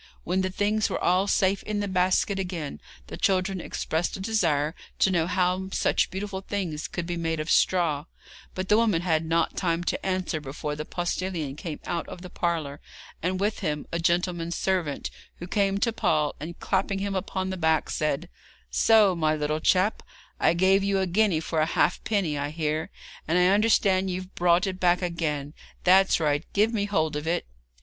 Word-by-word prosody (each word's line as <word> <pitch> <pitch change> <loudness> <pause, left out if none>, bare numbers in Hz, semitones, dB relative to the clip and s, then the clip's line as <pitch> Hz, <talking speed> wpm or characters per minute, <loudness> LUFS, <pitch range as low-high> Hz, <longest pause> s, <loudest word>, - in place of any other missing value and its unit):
When 185 +2 0
the 185 - -1
things 210 +3 0
were - - -1
all 185 +3 +2
safe 195 0 +2
in 210 -1 -3
the 205 - -1
basket 185 +1 +1
again 175 -6 -4 0.2
the - - -8
children 190 -1 +1
expressed 160 +1 -2
a - - -11
desire 165 -8 +1 0.2
to 190 - +3
know 170 -2 +1
how 185 +1 0
such - - +1
beautiful 190 0 -4
things 185 -6 -3
could 175 - -4
be 175 0 -3
made 165 -1 -1
of 155 +2 -2
straw, 160 -5 +2 0.5
but 185 0 -3
the 210 - +5
woman 215 -7 +2
had 165 -3 +1
not 165 0 0
time 170 -2 0
to - - -2
answer 185 -4 -1
before 150 +1 -5
the 150 +1 -5
postillion 175 -5 -3
came 155 0 -6
out 170 -2 -3
of 180 - -9
the 180 - -9
parlour, 160 -5 -2 0.4
and 185 +2 -1
with 210 +2 0
him 150 -6 -2
a 170 - -1
gentleman's 170 0 0
servant, 180 -7 -1 0.2
who 175 - -8
came 195 +1 +1
to 230 +2 +1
Paul, 155 -8 +1
and 165 +4 -7
clapping 195 0 0
him 200 0 -2
upon 190 0 -2
the - - -2
back, 160 -3 +1
said: 155 +2 -1 0.4
'So, 215 -4 +5
my 155 -2 +1
little 150 0 -1
chap, 185 +6 +2 0.4
I 165 - +3
gave 190 +2 +4
you 200 0 +1
a 190 - +1
guinea 185 -2 +2
for 160 0 -2
a 155 - +2
halfpenny, 175 -3 0
I 145 +1 -2
hear, 155 0 -2 0.4
and 165 +3 +2
I 180 0 +5
understand 195 -2 +3
you've 185 +1 -5
brought 175 +2 +3
it 190 -1 -4
back 180 0 +3
again; 150 -4 -2 0.3
that's 190 +1 +5
right, 150 -1 +1
give 215 +3 +3
me 205 -2 0
hold 160 -6 0
of 150 +1 -4
it.' 170 +1 0
180 Hz, 190 wpm, -26 LUFS, 160-190 Hz, 0.5 s, the